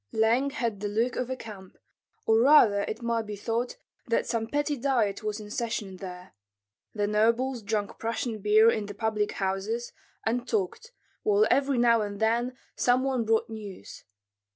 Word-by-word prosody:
Leng 235 +5 +2
had 230 -5 -2
the 205 - -2
look 225 +4 0
of 250 - -2
a 260 - -2
camp, 205 -6 -11 0.5
or 220 0 +4
rather 230 -6 +6
it 225 +2 -5
might 230 -2 -1
be 210 - -5
thought 230 +4 -2 0.3
that 230 - +1
some 225 -1 -2
petty 290 +3 0
diet 240 -7 0
was 215 0 -3
in 210 -1 -9
session 215 -5 -3
there. 180 -1 -9 0.6
The 205 -1 +1
nobles 230 +4 +1
drank 210 -1 -3
Prussian 230 0 -2
beer 215 +3 +5
in 210 -2 -2
the 205 - -8
public 215 -1 -1
houses, 200 +5 -2 0.3
and 240 +2 -1
talked, 220 - -2 0.3
while 420 0 +3
every 275 0 +2
now 235 -1 +4
and 205 -1 -4
then 235 +3 +1 0.2
some 250 +1 +2
one 260 -4 0
brought 225 0 +2
news. 210 - -9
225 Hz, 170 wpm, -28 LUFS, 210-245 Hz, 0.6 s, rather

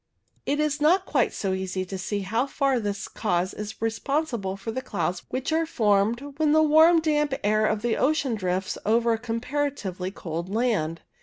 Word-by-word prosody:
It 290 +1 +1
is 300 -1 0
not 360 +5 +4
quite 270 -9 +1
so 195 -2 -2
easy 190 0 -3
to 190 - -6
see 200 +2 -3
how 225 +7 0
far 275 -2 +1
this 205 -2 -3
cause 180 -3 -1
is 210 +1 -7
responsible 225 -3 -1
for 200 +3 -5
the 260 +3 -3
clouds 180 -5 -2
which 260 +4 -3
are 325 0 +1
formed 230 +2 +1
when 305 -1 +3
the 315 0 +5
warm 320 +2 +6
damp 300 -3 +1
air 215 +1 +3
of 215 0 -1
the 240 -1 +1
ocean 280 -3 +1
drifts 185 -2 -2
over 230 +2 +3
a 225 - -2
comparatively 230 -5 -3
cold 170 -2 -5
land. 200 -8 0
225 Hz, 180 wpm, -25 LUFS, 195-285 Hz, -, warm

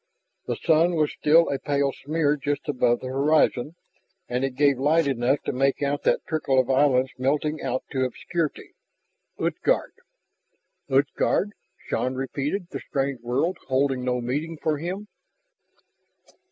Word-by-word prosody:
The - - -1
sun 170 +1 +3
was 155 -2 +1
still 165 +3 +4
a 140 - -1
pale 140 -1 0
smear 150 0 0
just 145 0 -3
above 125 -4 +1
the 130 - -5
horizon. 145 +1 +2 0.5
And 125 +2 -1
it 135 -1 -2
gave 140 -1 +3
light 155 +4 +3
enough 135 +1 +1
to - - -2
make 135 +2 +1
out 140 +1 0
that - - +2
trickle 150 -4 0
of 130 +1 +1
islands 130 -1 +3
melting 150 +4 0
out 130 - -2
to 130 -1 0
obscurity. 155 +5 -3 0.6
"Utgard - - 0 0.5
" - - -48
"Utgard?" 140 +8 +1 0.4
Shann 130 +1 -1
repeated, 140 +7 -3
the - - -4
strange 135 -3 -2
word 130 +9 0
holding 130 -1 +1
no 125 -1 0
meaning 150 +7 -3
for 150 -1 -1
him. 185 +6 -5
140 Hz, 145 wpm, -25 LUFS, 130-155 Hz, 0.6 s, still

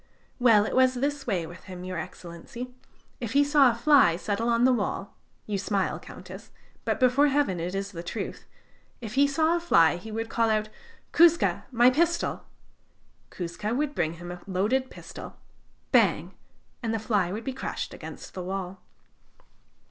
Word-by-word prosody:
"Well, 225 -4 +5
it - - -3
was 255 0 +4
this 280 +2 -2
way 185 -7 0
with 175 +3 -12
him, 180 -2 -8
Your 185 -2 -4
Excellency: 185 +12 -8 0.5
if 235 -2 -4
he 285 +1 +5
saw 285 -2 +5
a 235 - -1
fly 240 - +5
settle 210 +5 -2
on 235 0 +3
the 260 - +5
wall 205 -3 -3 0.3
you 205 -2 -2
smile, 200 0 -1
Countess, - - -11 0.4
but, - - 0
before 255 +3 +4
Heaven, 280 -11 +1
it 175 +3 -3
is 195 0 -3
the 170 -4 -6
truth 195 +4 -6 0.5
if 225 -2 -7
he 280 +2 +4
saw 315 +4 +2
a - - 0
fly, 170 - +4
he 215 +5 -9
would 225 +1 -3
call 230 0 +1
out: 215 0 0 0.4
'Kouzka, 340 0 +4
my 240 +1 +5
pistol!' 340 +5 0 0.8
Kouzka 185 +6 -4
would 295 +1 -1
bring 160 - -1
him 175 +1 -8
a 175 0 -8
loaded 215 +8 0
pistol - - -10 0.5
bang! - - +3 0.5
and 225 -2 -1
the - - +1
fly 205 -5 0
would 215 +4 -4
be 265 - -3
crushed 265 - -5
against - - -9
the 185 - -5
wall." 185 0 -5
225 Hz, 170 wpm, -27 LUFS, 185-260 Hz, 0.8 s, Well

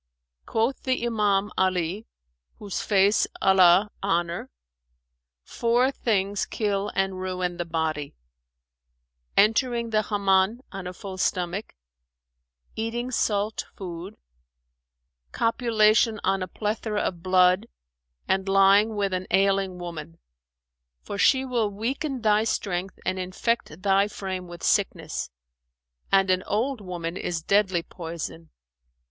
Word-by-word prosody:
Quoth 230 +4 0
the 255 -2 -1
Iman 210 -3 +1
Ali[FN#409] 185 +2 0 0.5
(whose 205 -3 -4
face 200 0 +3
Allah 190 +1 +5
honour!), 175 -3 -1 0.9
'Four 240 +3 +1
things 205 -6 0
kill 205 -2 -1
and 195 -1 -1
ruin 180 -1 -2
the 175 - -3
body: 160 -3 -2 1.2
entering 235 +2 +3
the 215 0 +3
Hammam 200 +2 +1
on 195 -2 -6
a 180 - -6
full 190 0 -8
stomach; 180 +2 -2 1.0
eating 235 +3 -3
salt 210 -2 0
food; 180 0 -7 1.1
copulation 225 -1 +2
on 195 0 +1
a 185 - -2
plethora 210 +2 -2
of 175 -2 -3
blood 185 +3 +3 0.6
and 190 0 0
lying 195 +3 +5
with 200 -2 -1
an 185 0 -2
ailing 195 -1 +2
woman; 165 -2 -7 0.9
for 200 - -6
she 265 +3 +4
will 240 -5 0
weaken 255 +5 -3
thy 215 0 +4
strength 190 -4 -2
and 185 0 -1
infect 185 -1 -2
thy 195 0 +3
frame 190 -3 -5
with 175 0 -10
sickness; 165 - 0 0.8
and 195 -1 +4
an 185 0 +2
old 235 +4 -1
woman 175 -3 -5
is 170 -3 -3
deadly 190 -3 +2
poison.' 165 -1 -7
195 Hz, 115 wpm, -25 LUFS, 180-215 Hz, 1.2 s, Allah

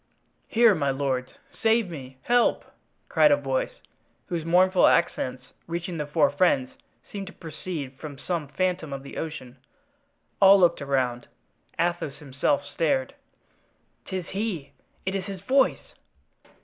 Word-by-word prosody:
"Here, 230 -1 +5
my 145 -6 0
lords! 130 -2 -1 0.3
save 225 -1 +3
me! 130 -4 -9
help!" 245 0 +2 0.4
cried 300 - +5
a 290 - +5
voice, - - -2 0.5
whose 170 -3 -2
mournful 180 +3 +4
accents, 130 -6 0
reaching 170 0 -4
the 150 - -3
four 145 -2 +3
friends, 145 -4 +2 0.4
seemed 200 -2 -5
to 200 - -9
proceed 155 -4 -7
from 150 -3 -8
some 165 0 -3
phantom 175 0 -1
of 135 0 -6
the 140 - -9
ocean. 145 -5 -6 0.8
All 195 0 +8
looked 170 -4 +3
around; 130 -3 -1 0.5
Athos 170 -5 -1
himself 145 0 -1
stared. 145 -3 0 0.9
"'Tis 185 -2 -5
he! 195 -8 -3 0.3
it 190 - -1
is 195 -2 -2
his 195 -2 -7
voice!" 265 +6 +1
165 Hz, 135 wpm, -26 LUFS, 140-190 Hz, 0.9 s, All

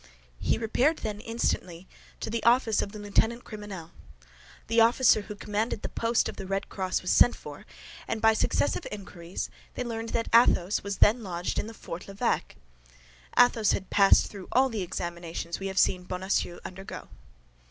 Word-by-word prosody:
He - - +1
repaired, 250 +8 +1
then, 210 -2 -4
instantly 190 -6 -2 0.3
to - - -4
the 230 -1 -2
office 235 -2 +4
of 200 - -4
the 215 - -9
lieutenant 225 +3 0
criminel. 205 -6 -8 0.7
The 230 +1 +3
officer 230 -1 +5
who 210 0 -8
commanded 210 +1 -2
the - - -3
post 230 0 +1
of - - -7
the 195 - -6
Red 195 +1 -2
Cross 185 -2 -2
was 180 - 0
sent 245 - +5
for, - - -11 0.4
and 225 - -2
by 220 0 +5
successive 265 - 0
inquiries 185 -4 -6 0.2
they - - -2
learned 230 -1 -4
that 230 0 -1
Athos 210 -5 +4
was 200 0 -4
then 230 +4 +5
lodged 180 -3 -3
in 220 - -4
Fort 180 -5 -8
l'Evêque. 195 0 -1 0.8
Athos 230 -4 +5
had 190 - -4
passed 195 -1 +6
through 195 -3 -9
all 265 +2 +4
the 220 -4 -3
examinations 170 -1 -5
we 195 - -3
have 190 0 -6
seen 180 -1 +3
Bonacieux 180 -1 -2
undergo. 195 +1 -8
205 Hz, 170 wpm, -28 LUFS, 185-230 Hz, 0.8 s, passed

